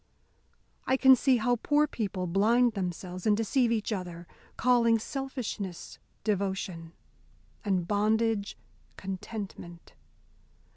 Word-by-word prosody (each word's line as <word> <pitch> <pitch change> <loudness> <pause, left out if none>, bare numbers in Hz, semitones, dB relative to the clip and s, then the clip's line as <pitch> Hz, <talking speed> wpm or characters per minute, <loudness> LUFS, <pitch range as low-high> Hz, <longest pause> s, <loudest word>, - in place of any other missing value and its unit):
I 260 - +3
can 265 0 +7
see 255 0 +3
how 245 +2 +1
poor 295 +6 +2
people 200 -9 -3
blind 225 +7 +3
themselves 180 -1 -4
and 210 -1 +4
deceive 230 +2 +1
each 220 -1 0
other, 175 -3 -6 0.3
calling 235 -2 +4
selfishness 230 -7 -5 0.2
devotion, 190 -5 -2 0.7
and 185 -4 0
bondage 215 0 +1 0.4
contentment. 190 -2 -7
210 Hz, 100 wpm, -29 LUFS, 185-240 Hz, 0.7 s, can